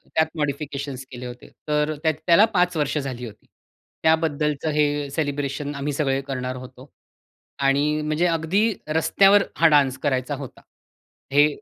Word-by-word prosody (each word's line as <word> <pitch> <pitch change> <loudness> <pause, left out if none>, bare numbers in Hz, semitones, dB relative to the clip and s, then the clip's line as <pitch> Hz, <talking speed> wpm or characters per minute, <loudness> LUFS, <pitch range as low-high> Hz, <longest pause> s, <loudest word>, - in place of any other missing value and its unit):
त्यात 160 0 +3
मॉडिफिकेशन्स 140 -2 -3
केले 125 0 -8
होते. 125 0 -9 0.2
तर 150 +1 +1
त्या 160 - +4 0.2
त्याला 175 +5 +7
5 180 -1 +2
वर्ष 150 0 0
झाली 130 -4 -4
होती. 105 -2 -12 0.6
त्याबद्दलचं 155 -2 +1
हे 145 -1 0
सेलिब्रेशन 145 -1 -3
आम्ही 140 +1 -3
सगळे 135 -2 0
करणार 130 -1 -3
होतो 130 +1 -11 0.8
आणि 150 +2 +2
म्हणजे 155 +3 0
अगदी 175 +7 +1
रस्त्यावर 195 +6 +4
हा 165 - +6
डान्स 140 -4 +3
करायचा 135 0 0
होता. 135 -2 -9 0.7
हे 145 +1 +6
145 Hz, 140 wpm, -23 LUFS, 135-155 Hz, 0.8 s, त्याला